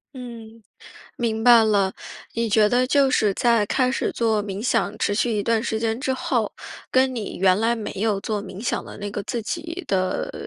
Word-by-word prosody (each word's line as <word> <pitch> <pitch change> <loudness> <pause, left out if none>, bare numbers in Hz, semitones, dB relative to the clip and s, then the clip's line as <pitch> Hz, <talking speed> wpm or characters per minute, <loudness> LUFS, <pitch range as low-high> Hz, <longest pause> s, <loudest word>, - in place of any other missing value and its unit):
嗯， 230 -3 -10 0.6
明 225 -2 -1
白 235 -1 +7
了。 200 -3 +2 0.4
你 230 -1 -1
觉 210 0 +4
得 250 +2 +2
就 275 0 +3
是 215 -5 +2
在 235 0 +2
开 255 +4 +1
始 - - -1
做 220 -3 0
冥 200 0 -5
想 215 -3 0
持 205 - 0
续 230 +3 +1
一 205 - 0
段 230 +1 +1
时 220 - -2
间 225 0 -1
之 265 0 -1
后， 260 - -1 0.4
跟 260 0 +3
你 220 -4 -5
原 185 0 +3
来 230 +2 +2
没 225 -3 -5
有 205 0 -1
做 210 -1 -3
冥 190 +2 -9
想 - - -2
的 - - -10
那 205 0 -5
个 205 - -4
自 235 +2 -3
己 335 - -5
的， 185 -1 0
呃， - - -7
225 Hz, 225 characters per minute, -23 LUFS, 205-245 Hz, 0.6 s, 白